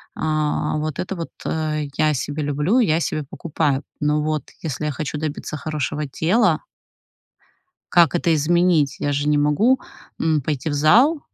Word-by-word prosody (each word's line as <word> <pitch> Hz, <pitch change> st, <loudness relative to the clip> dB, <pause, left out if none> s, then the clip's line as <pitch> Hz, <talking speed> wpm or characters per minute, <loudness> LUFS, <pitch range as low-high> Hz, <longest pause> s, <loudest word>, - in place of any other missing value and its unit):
а, 155 Hz, -1 st, -1 dB
вот 155 Hz, -1 st, -3 dB
это 190 Hz, +2 st, -3 dB
вот, 170 Hz, -2 st, -5 dB, 0.2 s
э, 155 Hz, -1 st, -1 dB
я 155 Hz, 0 st, +3 dB
себе 145 Hz, +3 st, -3 dB
люблю, 150 Hz, -, +1 dB
я 165 Hz, -8 st, +3 dB
себе 155 Hz, -2 st, -2 dB
покупаю, 145 Hz, -1 st, -2 dB, 0.2 s
но 150 Hz, 0 st, +1 dB
вот 155 Hz, -1 st, -1 dB, 0.2 s
если 150 Hz, -1 st, -3 dB
я 150 Hz, -, 0 dB
хочу 150 Hz, +1 st, -4 dB
добиться 155 Hz, 0 st, -4 dB
хорошего 150 Hz, -1 st, -3 dB
тела 170 Hz, -, +2 dB, 1.3 s
Как 175 Hz, -1 st, +5 dB
это 170 Hz, -1 st, +2 dB
изменить? 160 Hz, -1 st, +2 dB
Я 145 Hz, -, -1 dB
же 145 Hz, +1 st, -1 dB
не 150 Hz, 0 st, +3 dB
могу, 175 Hz, -, +3 dB, 0.4 s
м, 155 Hz, -3 st, +1 dB
пойти 150 Hz, +2 st, -2 dB
в -, -, -2 dB
зал, 240 Hz, -, +4 dB
155 Hz, 160 wpm, -21 LUFS, 150-165 Hz, 1.3 s, Как